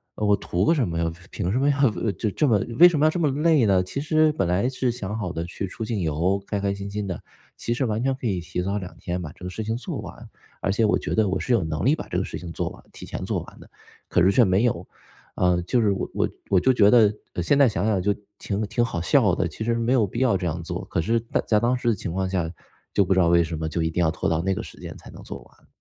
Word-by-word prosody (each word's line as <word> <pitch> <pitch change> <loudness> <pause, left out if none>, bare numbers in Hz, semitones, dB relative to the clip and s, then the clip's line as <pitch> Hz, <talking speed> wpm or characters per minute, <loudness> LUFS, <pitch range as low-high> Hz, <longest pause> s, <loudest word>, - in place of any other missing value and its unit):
呃， 105 - -2
我 105 0 +5
图 90 0 -1
个 - - +4
什 135 - +1
么 85 - -3
呀， 85 -1 0 0.2
凭 90 -2 -2
什 125 - +1
么 140 - +3
要 140 -3 +3 0.2
这 110 - -2
这 150 - +1
么 115 -5 +4 0.2
为 175 - +11
什 155 -4 -1
么 155 - +4
要 - - +6
这 175 - -2
么 155 -3 +2
累 150 -2 +3
呢？ 95 -2 +3
其 140 +9 -4
实 155 +1 +3
本 95 - 0
来 90 +7 +1
是 130 -1 -1
想 105 -2 -5
好 90 -5 -3
的， 85 -1 -3
去 95 +2 -5
出 110 - -6
境 110 -2 -2
游， 85 +5 0
开 100 - -2
开 100 0 0
心 100 0 -6
心 105 0 -3
的， 90 -3 -5 0.3
其 120 - -2
实 125 +3 0
完 110 +1 -1
全 135 - +2
可 125 -3 -4
以 95 -4 0
提 90 +1 -4
早 100 +3 -1
2 90 -4 -7
天 90 +1 -4
把 75 -3 -6
这 90 - -16
个 - - -3
事 110 +4 -5
情 110 +2 -2
做 120 - -5
完。 - - -10 0.3
而 95 - 0
且 110 +3 +1
我 105 - +3
觉 - - -4
得 110 -3 +2
我 95 0 -1
是 125 - 0
有 110 - +3
能 80 +2 -2
力 145 +5 +4
把 - - -8
这 90 - -3
个 95 - 0
事 - - -6
情 85 -2 -8
做 - - -2
完 - - -14
提 - - -10
前 - - -6
做 - - -1
完 - - -13
的， - - -15 0.4
可 90 - +2
是 95 - +5
却 120 - +5
没 95 +2 +2
有 90 -8 0 0.5
啊。 90 -1 +2
就 105 +8 0
是 105 - +3
我 95 - -2
我 - - +1 0.2
我 95 - +4
就 130 +8 +3
觉 105 -4 +5
得 110 -3 +6 0.3
现 140 - +3
在 135 - +6
想 100 -2 -1
想 105 -4 +1
就 100 +2 +1 0.2
挺 100 0 -3
挺 120 +3 0
好 100 -7 -2
笑 85 - +3
的， - - 0
其 - - -6
实 115 +1 +1
没 115 +2 +1
有 115 -5 +3
必 115 - -5
要 125 -6 +3
这 90 - -3
样 85 +1 -3
做， 85 +2 -5
可 85 - -2
是 115 +8 +1
在 115 - -2
在 105 -2 +4
当 125 +2 +1
时 120 -1 0
的 - - +3
情 90 - -5
况 95 +1 -1
下 90 -3 -1 0.5
就 100 - +4
不 95 - +2
知 95 - +2
道 85 - +4
为 85 0 +5
什 80 0 -4
么 80 - -2
就 80 +1 -1
一 80 - -1
定 90 - 0
要 80 - +3
拖 - - -2
到 80 0 +1
那 95 +1 0
个 - - -4
时 - - -12
间 - - -8
才 - - -13
能 - - -12
做 - - -7
完。 - - -25
100 Hz, 330 characters per minute, -24 LUFS, 90-120 Hz, 0.5 s, 为